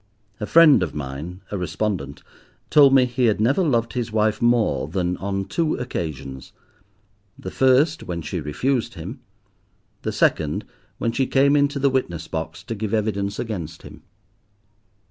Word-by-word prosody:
A 105 - -4
friend 165 -7 +7
of 90 - -3
mine, 75 +6 -6
a 100 - -2
respondent, 90 -4 -3 0.5
told 145 -2 +7
me 135 -2 +6
he 125 0 0
had 110 -3 +2
never 130 - +2
loved 115 -7 0
his 120 -3 -3
wife 110 -1 +1
more 120 -1 +2
than 90 -2 -1
on 95 0 -3
two 165 - 0
occasions—the 100 - -9
first 135 +5 +3
when 85 -2 -5
she - - -4
refused 125 - -1
him, - - -7 0.8
the - - -2
second 75 -2 +1 0.3
when 115 - -1
she 130 +2 0
came 140 +1 +3
into 145 0 +2
the 140 0 +2
witness 85 -11 -2
box 80 +1 -5
to - - -5
give 110 0 -2
evidence 100 -2 -1
against 85 -8 -5
him. - - -12
105 Hz, 150 wpm, -22 LUFS, 90-130 Hz, 0.8 s, friend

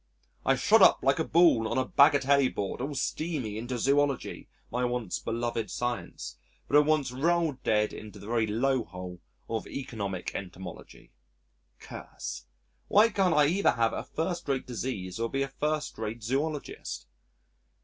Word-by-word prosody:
I - - +3
shot - - +4
up - - +6
like - - +3
a - - +2
ball 165 -10 +4
on 115 - -2
a 130 - +2
bagatelle 140 -1 +4
board 100 +3 -3
all 140 +2 -3
steamy 140 -6 -2
into 120 +2 -4
zoology 140 +3 0 0.2
(my 125 +1 -1
once 120 -5 -1
beloved 115 -2 -2
science) 120 0 -4 0.3
but - - 0
at 150 - +2
once 150 -5 +2
rolled 160 0 +1
dead 105 -1 +1
into 105 -2 -9
the - - -11
very 115 0 +1
low 125 +4 +1
hole 90 0 -9 0.3
of 115 -1 -3
Economic 105 -9 -4
Entomology! 90 -2 -9 0.7
Curse.... - - -8 0.4
Why 215 +3 +6
can't 195 -5 +2
I 150 -1 +6
either 185 +7 +3
have 115 -1 +1
a - - -3
first 170 +1 -3
rate 135 -2 0
disease 115 -6 -4
or 115 0 -1
be 135 +2 0
a 135 - -4
first 150 +2 -2
rate 110 +1 -4
zoologist? 140 - -3
125 Hz, 160 wpm, -29 LUFS, 110-145 Hz, 0.7 s, up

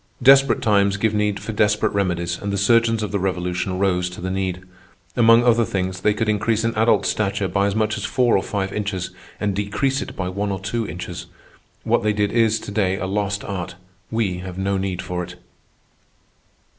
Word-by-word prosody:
Desperate 135 0 +6
times 100 -2 +3
give 110 +1 +1
need 105 -1 0
for - - -5
desperate 105 0 +2
remedies, 85 -3 -1
and 100 - -3
the 100 - -1
surgeons 115 +2 +3
of 105 - -3
the 100 - 0
Revolution 90 0 -2
rose 90 -2 +1
to 90 - -10
the 95 +1 -3
need. 95 -1 -2 0.5
Among 115 0 +6
other 120 -1 +4
things, 95 -2 -2
they 105 -1 +2
could 110 +1 -1
increase 110 +1 +1
an 115 0 0
adult's 110 +2 +3
stature 100 -1 0
by 100 +2 +1
as 100 - -2
much 110 0 0
as - - -6
four 125 -3 +2
or 95 - +3
five 95 -1 -3
inches 100 -4 -3 0.3
and 100 -2 -1
decrease 120 +7 0
it - - -7
by 95 - -3
one 100 +2 -2
or 95 - -3
two 105 +3 -3
inches. 90 +2 -7 0.6
What - - +2
they 105 0 +1
did 105 -1 0
is 115 -1 +2
to - - -7
day 95 -2 +1
a 95 - -3
lost 100 +1 -2
art. 90 -3 -5 0.3
We 105 -6 -1
have 90 0 -7
no 100 +1 0
need 95 -2 -3
for 90 -1 -3
it. 90 +1 -9
100 Hz, 205 wpm, -21 LUFS, 95-110 Hz, 0.6 s, Desperate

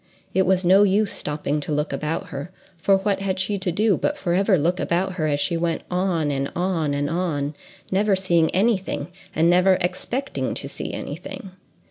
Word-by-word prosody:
It 190 -1 +2
was 190 -1 +2
no 190 +3 +6
use 205 +1 +3
stopping 150 0 -2
to 150 - -5
look 150 +1 -1
about 160 +4 -3
her, 145 +1 -6 0.3
for 195 +4 +3
what 195 0 0
had 195 -1 -1
she 200 +1 -1
to 185 -1 -1
do 210 +3 +2
but 295 - -1
forever 190 -2 +2
look 170 +4 +1
about 185 +3 0
her 160 -4 -1
as 145 -1 0
she 170 +4 +1
went 165 0 -1
on 180 -5 0
and 140 0 -2
on 170 -5 0
and 145 0 0
on—never 180 +5 -1
seeing 170 -4 +2
any 210 +4 +3
thing, 190 - -5 0.3
and 160 +1 +3
never 180 +2 +5
expecting 245 +9 -2
to - - -3
see - - -5
any - - -5
thing! 195 -7 -8
180 Hz, 190 wpm, -23 LUFS, 160-195 Hz, 0.3 s, no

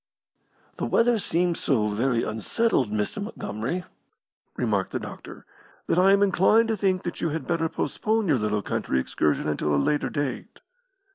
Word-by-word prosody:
"The - - -2
weather 230 -1 +3
seems 175 -2 0
so 110 -7 +1
very 115 +3 0
unsettled, 125 - 0
Mr. 105 - -2
Montgomery," 170 - -4 0.7
remarked 105 -5 0
the - - -1
doctor, - - -10 0.4
"that 175 - +1
I 190 +2 +6
am 200 0 +5
inclined 205 +4 +4
to 220 - +1
think 190 -2 0
that 175 - -5
you 165 - +1
had 160 +1 -4
better 165 -2 0
postpone 220 +4 -1
your 145 -6 +3
little 105 -1 -1
country 65 - -1
excursion 75 +4 0
until 75 -1 0
a - - +3
later 145 - +1
date." 145 -3 -4
160 Hz, 160 wpm, -25 LUFS, -, 0.7 s, I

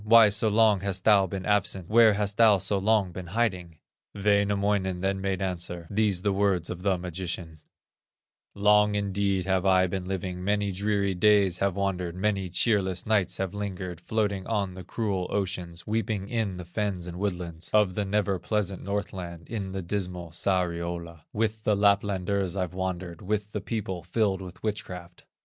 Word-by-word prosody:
Why 110 0 +7
so 105 +2 +1
long 110 -1 +4
hast 95 -1 -3
thou 100 -3 +5
been 95 0 -5
absent, 100 -3 +1
Where 110 0 +6
hast 100 0 -1
thou 110 -3 +6
so 95 +2 -1
long 100 -2 +2
been 90 0 -7
hiding?" 90 -8 0 0.4
Wainamoinen 100 -2 +1
then 95 0 0
made 95 0 -1
answer, 90 -2 -4
These 100 -3 +1
the 100 -2 +2
words 95 -4 +1
of 90 - -6
the 95 -1 +1
magician: 85 -2 -5 1.0
"Long 105 0 +4
indeed 100 -2 0
have 95 -1 +1
I 95 -1 +4
been 95 0 -3
living, 90 -1 -4
Many 100 +1 +1
dreary 100 0 0
days 100 -1 +3
have 100 -2 +1
wandered, 90 -3 -2
Many 95 -1 -1
cheerless 95 -1 +1
nights 105 -4 +1
have 95 -1 -2
lingered, 95 -4 -5
Floating 100 -2 -1
on 100 -4 0
the 90 0 -9
cruel 95 -2 -2
ocean, 90 -4 -2
Weeping 105 -2 -2
in 110 -6 -1
the 90 - -7
fens 95 -1 -2
and 90 0 -7
woodlands 90 -4 -3
Of 105 -3 +3
the 105 - -1
never 100 -1 0
pleasant 100 0 -2
Northland, 95 -4 -5
In 100 -4 -4
the 95 0 -4
dismal 90 -2 -4
Sariola; 85 -2 -2
With 110 0 -1
the 105 - +2
Laplanders 100 -2 +1
I've 90 -2 -2
wandered, 90 -2 -4
With 105 +1 -2
the 105 - -3
people 95 -4 -3
filled 95 +2 0
with 90 -1 -10
witchcraft." 90 -5 -5
95 Hz, 165 wpm, -27 LUFS, 90-105 Hz, 1.0 s, Why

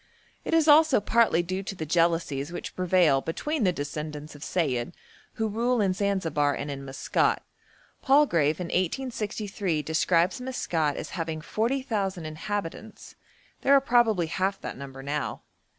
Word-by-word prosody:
It 330 - 0
is 320 -1 +3
also 305 -3 +6
partly 220 -4 +3
due 185 +2 -3
to 195 0 -6
the 160 - -5
jealousies 165 -3 +1
which 175 - -6
prevail 175 -6 +3
between 285 - -2
the 180 - +4
descendants 150 -1 -6
of 145 0 -11
Sayid 145 -4 -1 0.4
who 220 - -1
rule 235 +3 0
in 195 -3 +2
Zanzibar 165 -8 0
and 145 +1 -4
in 140 -1 -6
Maskat. 135 0 0 0.6
Palgrave 175 - +3
in 175 -2 -4
1863 200 - -2
describes 170 - +1
Maskat 165 - -1
as - - -6
having 160 -2 -3
40,000 215 - -2
inhabitants; 205 +5 -5 0.5
there 280 - +5
are - - +7
probably 235 -8 +3
half 190 +4 -1
that - - -5
number 135 0 -9
now. 145 +1 -3
180 Hz, 145 wpm, -27 LUFS, 155-220 Hz, 0.6 s, are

